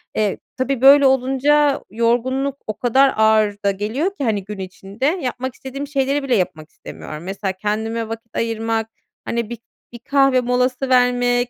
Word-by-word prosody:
Eee, 210 -2 0 0.2
tabii 260 -1 -1
böyle 280 +1 +8
olunca 270 +2 +2
yorgunluk 250 +4 0
o 215 - -4
kadar 265 +3 +3
ağır 215 -1 +3
da 200 - +4
geliyor 215 - -2
ki 285 - -4
hani, 215 -5 0
gün 205 +1 -8
içinde 195 +5 -6
yapmak 260 -5 -2
istediğim 275 +2 -7
şeyleri 275 0 0
bile 260 -3 +1
yapmak 160 -5 -2
istemiyorum. 155 0 -10
Mesela, 195 +1 -3
kendime 220 +3 -3
vakit 225 0 -8
ayırmak, 225 -1 -1 0.4
hani, 235 -2 -2
bir 240 - -5 0.4
bir 240 - -9
kahve 270 +1 +3
molası 250 +1 0
vermek, 245 -1 +2
245 Hz, 155 wpm, -20 LUFS, 215-270 Hz, 0.4 s, böyle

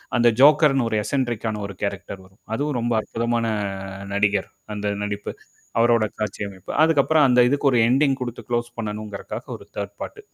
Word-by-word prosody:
அந்த 120 -1 +4
ஜோக்கர் 150 0 +7
னு 125 - +2
ஒரு 110 - -1
எஸ்என்ட்ரிக் 120 -3 -1
ஆன 105 -1 -3
ஒரு 100 - -8
கேரக்டர் 100 -1 -4
வரும். 95 +2 -23
அதுவும் 145 +2 -1
ரொம்ப 120 0 0
அற்புதமான 115 +1 -1 0.7
நடிகர். 100 -1 +1 0.3
அந்த 105 0 -3
நடிப்பு, 105 0 -3 0.5
அவரோட 115 -1 +4 0.2
காட்சி 105 -2 -3
அமைப்பு, 95 -2 -9
அதுக்கப்புறம் 155 -1 +4
அந்த 125 -1 +4
இதுக்கு 145 +3 0
ஒரு 125 - +3
எண்டிங் 135 +3 +3
குடுத்து 120 -2 -5
குளோஸ் 120 0 -1
பண்ணணுங்கறக்காக 105 -2 -5
ஒரு - - -15
தேர்ட் 100 0 -4
பார்ட். - - -6
115 Hz, 170 wpm, -23 LUFS, 105-130 Hz, 0.7 s, ஜோக்கர்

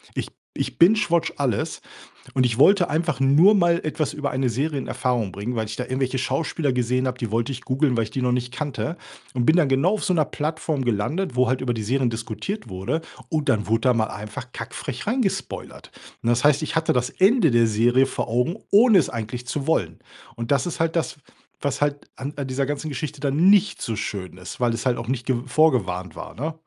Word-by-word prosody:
ich - - -2
b - - -38 0.2
ich - - -3
bingewatche 175 -2 +4
alles 130 -7 -1 0.5
und 130 -1 +3
ich 120 +1 0
wollte 190 +2 +6
einfach 155 -3 -1
nur 150 +10 +6
mal 175 -3 +3
etwas 155 -1 -2
über 145 -1 -2
eine 130 -1 0
Serie 145 +5 -1
in 135 - -3
Erfahrung 120 -4 -1
bringen, 105 +5 -4
weil 110 -1 -1
ich 110 - -7
da 125 - -2
irgendwelche 130 +1 -1
Schauspieler 140 +2 -1
gesehen 125 +1 0
habe, 125 0 -3
die 115 -4 -4
wollte 115 +4 0
ich 130 - -6
googeln, 130 -1 +1
weil 115 - +2
ich 110 - -7
die 130 - -3
noch 125 0 +1
nicht 125 0 -2
kannte 145 +4 -3 0.4
und 120 -2 0
bin 155 - +6
dann 170 -5 +4
genau 140 +9 +2
auf - - -5
so 185 - +1
‘ner 155 -4 +3
Plattform 155 -3 -2
gelandet, 125 - -1
wo 125 0 +3
halt 130 +2 0
über 125 -2 0
die 110 - -4
Serien 125 +2 +1
diskutiert 115 - -5
wurde 95 - -2 0.3
und 155 -3 -1
dann 110 -5 +2
wurde 115 +2 +1
da 125 -2 +4
mal 110 -2 +1
einfach 105 +5 -8
kack 115 +2 -7
frech 135 +6 -5
rein 250 +3 +1
gespoilert. 195 - -4 0.3
Und, 115 - 0
das 120 +2 +2
heißt, 145 0 +4
ich 155 - -3
hatte 160 0 +2
das 125 0 0
Ende 200 -1 +4
der 120 -2 +4
Serie 120 +4 +3
vor - - -3
Augen, 125 - 0
ohne 215 -1 +6
es 150 - 0
eigentlich 120 +2 -5
zu 140 +2 -3
wollen. 85 - 0 0.4
Und, 115 +3 -4
das 140 +3 +2
ist 170 - -5
halt 165 +1 0
das, 155 -5 -1 0.5
was 140 0 -2
halt 145 0 -1
an 140 +2 -6
an 140 -2 -3
dieser 135 +1 -1
ganzen 145 +1 -3
Geschichte 150 0 -5
dann 145 +6 +3
nicht 205 0 +4
so 115 - -2
schön 95 -3 -5
ist, 90 +5 -9
weil 120 -2 +2
es 115 - -5
halt 125 -2 +2
auch 115 - -6
nicht 125 -2 -2
ge 130 -2 +1
vorgewarnt 120 - +1
war, - - -8
ne? 155 +6 -3
130 Hz, 230 wpm, -23 LUFS, 120-155 Hz, 0.5 s, wollte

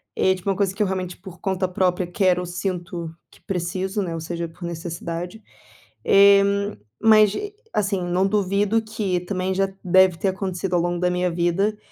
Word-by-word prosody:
É 190 0 +3
tipo 185 +1 -5
uma 195 - +1
coisa 195 -2 0
que 210 - +1
eu - - +1
realmente, 185 -2 -3
por 190 -1 -12
conta 190 -1 -1
própria, 180 0 0
quero 180 0 +1
ou - - -4
sinto 175 -2 -4 0.2
que - - -21
preciso, 190 +2 -2
né. 175 -4 -3
Ou 165 - -4
seja, 170 +1 -4
por 165 +2 -14
necessidade. 170 +3 -5 0.6
Eh, 200 0 +7 0.6
mas 215 -2 +6 0.4
assim, 195 -2 0
não 180 +2 +1
duvido 205 +2 +1
que 210 -5 -2
também 185 0 -2
já 195 +1 +1
deve 185 -1 +4
ter 195 - -1
acontecido 185 -1 -3
ao 175 - +3
longo 175 0 -1
da 180 0 +2
minha 180 0 0
vida 175 +5 0
185 Hz, 180 wpm, -23 LUFS, 175-195 Hz, 0.6 s, Eh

